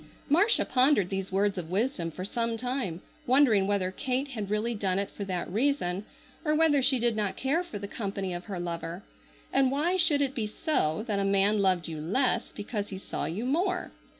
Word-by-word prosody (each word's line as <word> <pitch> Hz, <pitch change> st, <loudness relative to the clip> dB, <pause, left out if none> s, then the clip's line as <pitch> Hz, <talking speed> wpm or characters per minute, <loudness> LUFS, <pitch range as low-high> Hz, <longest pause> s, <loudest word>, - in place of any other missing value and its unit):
Marcia 390 Hz, +10 st, +4 dB
pondered 255 Hz, -8 st, +4 dB
these 195 Hz, -1 st, -3 dB
words 195 Hz, 0 st, +1 dB
of 165 Hz, -2 st, -6 dB
wisdom 195 Hz, -3 st, -1 dB
for 180 Hz, +3 st, -6 dB
some 230 Hz, +2 st, -1 dB
time, 245 Hz, -8 st, -2 dB, 0.3 s
wondering 240 Hz, -7 st, +4 dB
whether 195 Hz, -2 st, 0 dB
Kate 260 Hz, +7 st, -2 dB
had 215 Hz, -7 st, -5 dB
really 215 Hz, +3 st, 0 dB
done 195 Hz, -4 st, 0 dB
it 200 Hz, 0 st, -2 dB
for 205 Hz, -, -6 dB
that 180 Hz, -3 st, -3 dB
reason, 205 Hz, -4 st, 0 dB, 0.4 s
or 305 Hz, -2 st, +1 dB
whether 305 Hz, -3 st, +4 dB
she 265 Hz, 0 st, +5 dB
did 235 Hz, -1 st, +1 dB
not 210 Hz, -3 st, -1 dB
care 290 Hz, +7 st, 0 dB
for 290 Hz, -12 st, -7 dB
the 200 Hz, 0 st, -6 dB
company 195 Hz, -3 st, -3 dB
of 175 Hz, 0 st, -6 dB
her 195 Hz, -4 st, -5 dB
lover. 170 Hz, +1 st, -5 dB, 0.5 s
And 270 Hz, -1 st, +4 dB
why 325 Hz, +7 st, +1 dB
should 300 Hz, -5 st, +3 dB
it 270 Hz, -1 st, -1 dB
be 220 Hz, -4 st, -2 dB
so 210 Hz, -, 0 dB
that 210 Hz, -4 st, -1 dB
a -, -, +1 dB
man 200 Hz, +2 st, +3 dB
loved 185 Hz, -3 st, +2 dB
you 160 Hz, -2 st, -5 dB
less 225 Hz, -, 0 dB
because 205 Hz, 0 st, -4 dB
he 190 Hz, -, -6 dB
saw 190 Hz, -, -4 dB
you 195 Hz, +9 st, -3 dB
more? 360 Hz, +7 st, 0 dB
210 Hz, 205 wpm, -28 LUFS, 190-265 Hz, 0.5 s, she